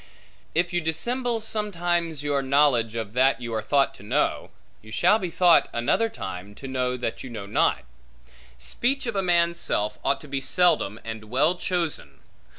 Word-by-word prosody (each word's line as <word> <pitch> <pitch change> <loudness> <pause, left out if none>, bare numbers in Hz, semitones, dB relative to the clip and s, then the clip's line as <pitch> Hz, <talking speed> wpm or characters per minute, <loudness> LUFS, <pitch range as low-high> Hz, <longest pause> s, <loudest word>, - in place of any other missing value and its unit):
If 175 +1 +1
you 175 - +1
dissemble, 235 +9 -1
sometimes, 175 -8 -1
your 145 -1 0
knowledge 135 -5 +2
of 110 -2 -4
that 130 0 +3
you 120 -2 -5
are 110 - -1
thought 140 +5 +2
to - - -15
know, 105 - -1 0.3
you 110 - -15
shall 210 - +3
be 185 -4 -3
thought, 175 0 +4
another 120 - +1
time, 100 - -7
to 135 - -8
know 125 -1 -1
that 120 -2 -4
you 130 - -7
know 110 -4 -7
not. 100 - +1 0.7
Speech 245 - -1
of 235 -3 -3
a 195 - +1
man's 170 -2 +2
self 105 +1 -1
ought 140 - +1
to 150 - -12
be 135 -1 -3
seldom, 150 - +2
and 110 -1 -6
well 135 +9 +2
chosen. 175 -3 -3
145 Hz, 175 wpm, -25 LUFS, 115-175 Hz, 0.7 s, thought